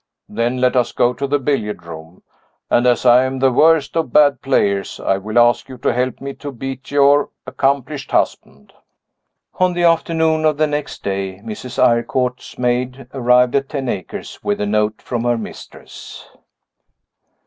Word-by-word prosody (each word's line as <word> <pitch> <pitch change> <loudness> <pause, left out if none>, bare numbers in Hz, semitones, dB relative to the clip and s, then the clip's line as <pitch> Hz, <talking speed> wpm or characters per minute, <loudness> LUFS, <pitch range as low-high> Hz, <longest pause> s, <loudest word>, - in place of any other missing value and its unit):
Then 120 +2 -1
let 125 0 +2
us 125 -2 +1
go 120 0 +2
to 140 +2 -3
the 145 +1 +1
billiard 125 -9 -2
room; 80 +1 -11 0.5
and 120 +1 +3
as 125 +1 +2
I 125 +1 +6
am 130 0 -3
the 130 0 +3
worst 155 +3 +3
of 160 -7 -1
bad 145 0 +4
players, 100 -7 0
I 95 - 0
will 110 +4 -4
ask 120 +2 +3
you 130 - -9
to - - 0
help 125 0 -2
me 140 0 -6
to 145 - -5
beat 135 +1 -7
your 145 0 +3 0.2
accomplished 140 +1 -2
husband." 70 0 -2 0.9
On 185 -1 +3
the 175 0 -1
afternoon 160 -1 +2
of 155 -2 +2
the 155 - +3
next 150 -1 -4
day, 95 -1 -3
Mrs. 115 +3 -7
Eyrecourt's 125 +2 0
maid 125 +1 -2
arrived 125 -1 +3
at 135 -1 0
Ten 135 -3 -4
Acres 95 -5 -6
with 105 - -1
a 105 - -1
note 105 +1 -1
from 120 -2 -3
her 120 -1 +1
mistress. 110 - -10
125 Hz, 170 wpm, -18 LUFS, 115-140 Hz, 0.9 s, I